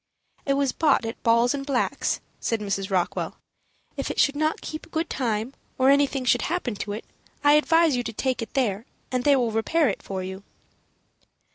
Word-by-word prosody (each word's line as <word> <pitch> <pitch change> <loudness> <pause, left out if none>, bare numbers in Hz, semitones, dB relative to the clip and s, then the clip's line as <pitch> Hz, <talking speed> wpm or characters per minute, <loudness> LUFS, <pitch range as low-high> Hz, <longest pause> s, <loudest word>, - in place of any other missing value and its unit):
"It 275 - +3
was 275 -2 +1
bought 290 -6 +2
at 225 - -6
Ball 235 +1 +4
& 275 - -6
Black's," 270 -3 0 0.2
said 230 - -1
Mrs. 200 -2 -2
Rockwell. 185 -3 -1 0.6
"If - - -3
it - - -3
should 285 - +4
not 310 +1 0
keep 310 +1 -7
good 320 +1 -2
time, 230 -1 -1 0.2
or 265 +1 +5
anything 280 -2 +2
should 245 0 +3
happen 325 -8 -2
to 205 0 -4
it, 215 - -6 0.4
I 290 0 +6
advise 325 0 +4
you 245 - 0
to 225 - -4
take 255 +3 -1
it 230 - -7
there, 225 -4 0 0.2
and 250 -1 0
they 285 -1 +6
will 245 -4 +1
repair 260 +7 +2
it 195 - -4
for 190 -1 -5
you." 190 +1 -6
255 Hz, 190 wpm, -25 LUFS, 220-285 Hz, 0.6 s, I